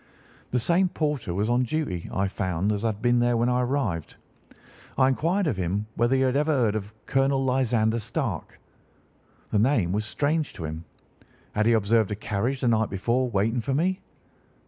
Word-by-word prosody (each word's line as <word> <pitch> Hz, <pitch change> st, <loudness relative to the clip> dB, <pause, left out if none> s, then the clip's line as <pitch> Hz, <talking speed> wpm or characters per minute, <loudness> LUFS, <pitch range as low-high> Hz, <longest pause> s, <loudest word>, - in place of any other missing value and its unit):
The 125 Hz, -, 0 dB
same 175 Hz, +9 st, +2 dB
porter 150 Hz, -, -2 dB
was 100 Hz, +5 st, 0 dB
on 120 Hz, +2 st, +2 dB
duty, 125 Hz, -, -2 dB
I 95 Hz, +1 st, 0 dB
found, 95 Hz, 0 st, -1 dB
as 105 Hz, -1 st, -1 dB
had 110 Hz, -1 st, -2 dB
been 120 Hz, 0 st, +3 dB
there 120 Hz, 0 st, +2 dB
when 120 Hz, +2 st, +2 dB
I 125 Hz, 0 st, +2 dB
arrived. 120 Hz, -, -2 dB, 0.8 s
I 130 Hz, -, +5 dB
inquired 170 Hz, +9 st, +1 dB
of 135 Hz, -, 0 dB
him 95 Hz, +3 st, -1 dB
whether 120 Hz, +3 st, +2 dB
he 135 Hz, -, +2 dB
had 130 Hz, 0 st, +1 dB
ever 150 Hz, +2 st, +2 dB
heard 120 Hz, -8 st, +2 dB
of 105 Hz, -1 st, -4 dB
Colonel 135 Hz, 0 st, +1 dB
Lysander 120 Hz, -3 st, +1 dB
Stark. 110 Hz, -, -4 dB, 0.9 s
The 105 Hz, -, +2 dB
name 110 Hz, -7 st, +2 dB
was 105 Hz, +3 st, -1 dB
strange 150 Hz, +6 st, -1 dB
to 80 Hz, -, -6 dB
him. 80 Hz, +2 st, -6 dB, 0.7 s
Had 105 Hz, +1 st, +1 dB
he 115 Hz, -, +5 dB
observed 110 Hz, 0 st, +2 dB
a 105 Hz, -, -2 dB
carriage 110 Hz, +6 st, -2 dB
the 125 Hz, -, +1 dB
night 110 Hz, -1 st, +2 dB
before 120 Hz, +6 st, 0 dB
waiting 115 Hz, +3 st, 0 dB
for 135 Hz, +4 st, -1 dB
me? 185 Hz, +5 st, 0 dB
120 Hz, 185 wpm, -26 LUFS, 105-135 Hz, 0.9 s, I